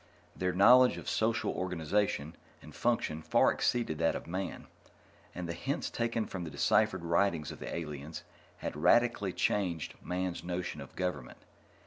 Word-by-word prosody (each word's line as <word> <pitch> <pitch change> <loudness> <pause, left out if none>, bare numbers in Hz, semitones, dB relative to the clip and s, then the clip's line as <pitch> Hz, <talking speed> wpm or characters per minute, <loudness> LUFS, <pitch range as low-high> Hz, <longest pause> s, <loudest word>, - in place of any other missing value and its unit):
Their 90 0 0
knowledge 125 +7 +6
of - - -8
social 115 +1 +1
organization 90 -2 -1 0.2
and 75 - -13
function 115 -9 0
far - - +4
exceeded 115 -11 0
that 80 - +2
of - - -5
Man, 95 +2 -4 0.7
and 90 -1 -4
the 85 - -3
hints 135 +11 -3
taken 115 -1 -1
from 95 -2 -5
the 80 - -5
deciphered 85 - +2
writings 85 -3 +1
of - - -10
the - - -6
aliens 75 -1 -6 0.3
had - - -5
radically 105 +4 +3
changed 90 -6 -1
Man's 90 0 -3
notions 90 -3 -4
of 70 - -11
government. 90 -9 -3
90 Hz, 150 wpm, -32 LUFS, 80-100 Hz, 0.7 s, knowledge